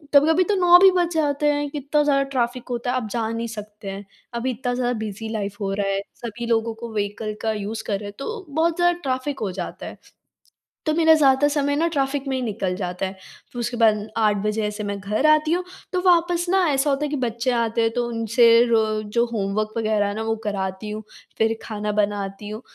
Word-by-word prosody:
कभी-कभी 320 +5 +6
तो 410 +2 0
9 355 -1 +7
भी 380 +1 +8
बज 350 -1 +1
जाते 295 -1 +1
हैं, 290 0 -2
इतना 295 +1 +1
ज़्यादा 275 -1 +3
ट्रैफ़िक 250 -1 -2
होता 245 0 -2
है - - -1
आप 240 -4 -3
जा 230 -2 -1
नहीं 230 +1 -3
सकते 210 -2 -8
हैं। 195 +1 -7 0.3
अभी 235 +2 -1
इतना 245 +1 -3
ज़्यादा 245 0 0
बिज़ी 220 +1 -5
लाइफ़ 205 -2 -3
हो 195 0 -1
रहा 200 0 -1
है, 195 0 0
सभी 235 0 -6
लोगों 230 -1 +1
को 225 0 -8
व्हीकल 210 +1 -3
का 220 - 0
यूज़ 215 +2 -4
कर 205 - 0
रहे 205 - -8
हैं - - -11
तो 430 +7 -5
बहुत 320 +3 +1
ज़्यादा 350 0 +2
ट्रैफ़िक 265 +1 -2
हो 205 -4 -2
जाता 180 -1 -6
है। - - -8 0.9
तो 310 - +2
मेरा 320 0 +5
ज़्यादा 280 -1 +4
समय 285 -1 0
ना 330 +3 +2
ट्रैफ़िक 280 -2 -1
में 265 - -1
ही - - -2
निकल 200 -5 -2
जाता 180 0 -3
है। 190 - -5 0.4
फिर 245 - -8
उसके 240 +1 -2
बाद 220 -2 +4 0.2
8 215 -2 +3
बजे 210 0 0
से 210 0 -6
मैं 200 0 -3
घर 210 +9 0
आती 305 +1 +4
हूँ, 360 +1 0 0.3
तो 365 - +1
वापस 345 0 +3
ना 385 +2 +3
ऐसा 280 +1 +2
होता 275 +2 0
है 295 - -1
कि 295 - -1
बच्चे 235 0 -1
आते 230 -1 0
हैं 225 - +2
तो 240 0 -1
उनसे 230 +1 +2 0.3
रो 225 -1 +4 0.2
जो 235 +3 +1
होमवर्क 215 -2 -1
वगैरह 215 -2 +1
है 205 - -2
ना 220 - -3
वो 225 0 0
कराती 195 0 -3
हूँ। 215 +1 -5 0.4
फिर 225 0 +2
खाना 210 -1 -3
बनाती 205 -1 -2
हूँ, 215 +1 -6
235 Hz, 230 wpm, -23 LUFS, 210-285 Hz, 0.9 s, भी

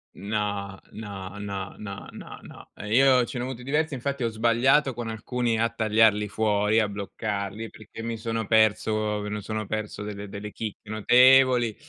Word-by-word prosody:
No, 100 -1 -3
no, 100 -2 -8
no, 100 -1 -5
no, 100 -2 -7
no, - - -10
no. - - -13
Eh, 105 +1 -5
io 130 -2 +5
ce 125 0 -6
ne - - -2
ho - - -3
avuto 125 -2 -7
diversi, 150 +2 0
infatti 135 0 -3
ho - - +2
sbagliato 120 +5 +3
con 115 -1 -5
alcuni 115 +1 -1
a 115 - +2
tagliarli 110 -2 +3
fuori, 105 +1 +1
a 110 - +2
bloccarli, 100 +1 -4
perché 110 +1 -11
mi 115 0 -3
sono 115 0 -3
perso 110 -1 +2
me 105 - -5
lo 105 0 -4
sono 110 +1 -4
perso 105 0 -4
delle 105 -1 -6
delle 105 +1 -7
chicche 110 -1 -7
notevoli. 125 +1 +5
110 Hz, 175 wpm, -26 LUFS, 105-120 Hz, -, io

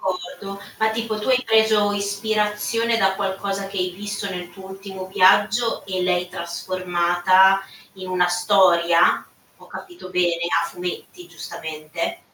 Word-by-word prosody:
D'accordo 190 +2 -5 0.2
ma 220 0 +2
tipo 220 -1 -3
tu 215 - -5
hai 255 -1 +3
preso 220 -2 +3
ispirazione, 210 +3 -1
da 195 -2 +2
qualcosa 195 0 -3
che 195 -1 -5
hai 180 0 0
visto 200 +2 -5
nel 180 -2 -6
tuo 190 +2 -12
ultimo 190 -1 -8
viaggio 205 +5 +3
e 185 -1 -2
l'hai 180 0 0
trasformata 185 +2 +2 0.3
in 185 -1 -9
una 180 -1 +2
storia? 175 -2 +3 0.3
Ho - - -18
capito 350 - -11
bene? 175 -2 +1 0.2
A - - -2
fumetti, 175 0 -7
giustamente. 165 - -6
190 Hz, 135 wpm, -22 LUFS, 180-210 Hz, 0.3 s, hai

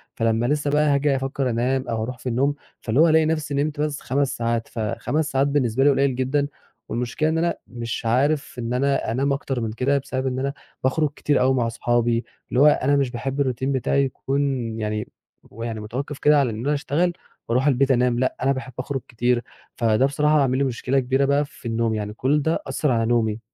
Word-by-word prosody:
فلمّا 115 +1 +1
لسه 145 +2 0
بقى 150 +1 +3
هاجي 140 0 +2
أفكّر 135 0 -1
أنام 125 +3 0
أو 115 -1 -2
هارُوح 125 +3 -4
في 125 +1 -5
النوم، 135 +4 +1 0.3
فاللي 115 +4 0
هو 165 +1 +6
ألاقي 160 0 +4
نفسي 155 -2 -1
نِمت 145 +1 -1
بس 150 -1 -2
5 140 +1 -1
ساعات 115 -1 -1
ف - - -8
5 145 +8 -1
ساعات 135 +1 +2
بالنسبة 135 -3 +1
لي 145 - +6
قليل 135 -1 +2
جدًا، 135 +3 0 0.4
والمشكلة 125 +6 -1
إن 160 - 0
أنا 170 +1 +1
مش 120 -1 -5
عارف 140 +6 +1
إن 120 0 -3
أنا 135 -2 +1
أنام 135 +4 +1
أكتر 135 -2 -3
من 110 -1 -2
كده، 130 +5 +1
بسبب 130 -1 -3
إن 130 0 -2
أنا 140 +1 -1 0.3
باخرج 150 +4 +2
كتير 145 - +1
أوي 130 +1 +4
مع 125 -3 +1
أصحابي، 120 0 0 0.2
اللي 125 - 0
هو 145 - +7
أنا 145 -1 +3
مش 135 -3 +1
باحب 135 +3 -3
الروتين 130 0 -1
بتاعي 140 +1 +1
يكون 135 +1 -2 0.4
يعني 105 0 -2 0.5
هو 115 - -7
يعني 115 -2 -4
متوقِّف 130 +7 -5
كده 150 0 +5
على 135 -3 +2
إن 110 -1 -5
أنا 145 - +2
أشتغل 155 +5 0 0.4
وأرُوح 125 +4 +2
البيت 135 0 +3
أنام، 125 -1 +2
لأ، 130 - 0
أنا 135 - +3
باحب 130 -1 -4
أخرج 135 0 -3
كتير، 120 +1 0 0.3
فده 115 +2 +2
بصراحة 150 +2 +2
عامل 130 -1 +2
لي 140 - +2
مشكلة 130 +1 0
كبيرة 135 +2 +1
بقى 140 +1 +2
في 140 -3 -11
النوم، 115 0 0
يعني 105 -1 -3
كُلّ 140 +7 +1
ده 160 +3 0
أثّر 150 -3 0
على 115 -2 +2
نومي. 115 -2 +1
130 Hz, 215 wpm, -23 LUFS, 120-140 Hz, 0.5 s, هو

